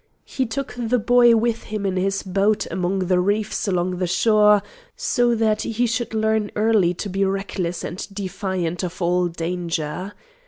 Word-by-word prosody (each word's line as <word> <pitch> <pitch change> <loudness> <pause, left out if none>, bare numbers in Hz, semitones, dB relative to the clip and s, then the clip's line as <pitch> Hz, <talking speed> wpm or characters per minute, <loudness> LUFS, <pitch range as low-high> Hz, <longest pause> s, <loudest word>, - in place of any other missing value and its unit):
He 260 -2 -2
took 270 +4 -4
the 240 +1 +1
boy 240 +1 +5
with 230 0 0
him 210 -1 -4
in 190 -1 0
his 195 +1 0
boat 200 +3 +1
among 185 +1 -1
the 180 0 +2
reefs 205 +3 0
along 180 -1 0
the 180 - 0
shore, 210 +2 +4 0.3
so 240 -2 +1
that 220 -1 +1
he 235 +2 0
should 230 0 -2
learn 220 -1 +1
early 210 -5 +2
to 205 - -4
be 195 +1 -1
reckless 190 -3 -2
and 180 - -5
defiant 185 -3 -3
of 180 +1 -5
all 180 0 +1
danger. 170 +1 -3
195 Hz, 165 wpm, -22 LUFS, 180-220 Hz, 0.3 s, boy